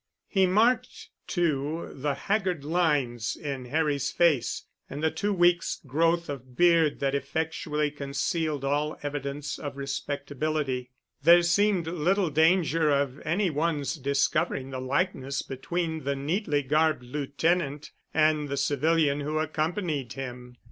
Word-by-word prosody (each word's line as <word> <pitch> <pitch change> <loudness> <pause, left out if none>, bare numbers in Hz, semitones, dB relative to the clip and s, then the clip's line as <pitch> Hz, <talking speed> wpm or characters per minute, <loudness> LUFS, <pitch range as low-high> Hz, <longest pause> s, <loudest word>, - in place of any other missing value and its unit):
He 190 -2 +3
marked, 225 +7 +1 0.2
too, 160 -2 -1
the 140 +1 -2
haggard 185 -2 -1
lines 145 -9 0
in 140 -4 -5
Harry's 145 0 0
face, 165 -8 +2 0.2
and 145 +3 -6
the 160 - +3
two 205 0 -1
weeks' 175 -2 +2
growth 165 +5 +1
of 130 -3 -8
beard 170 -4 +4
that 135 -1 +1
effectually 150 +1 -1
concealed 145 +1 -2
all 145 +2 0
evidence 145 0 -4
of 145 -2 -6
respectability. 140 -1 -3 0.3
There 170 +4 +7
seemed 185 +1 +2
little 175 +2 +1
danger 160 0 +3
of 140 -1 +1
any 175 +4 +1
one's 150 -1 0
discovering 140 0 0
the 130 -1 -4
likeness 140 0 -1
between 160 +4 -3
the 140 +1 -1
neatly 145 +1 -1
garbed 155 -1 +2
lieutenant 145 +3 -1 0.2
and 155 -1 +2
the 140 - -2
civilian 145 +1 +2
who 150 +2 -2
accompanied 155 - -2
him. 125 -2 -7
150 Hz, 125 wpm, -27 LUFS, 140-170 Hz, 0.3 s, There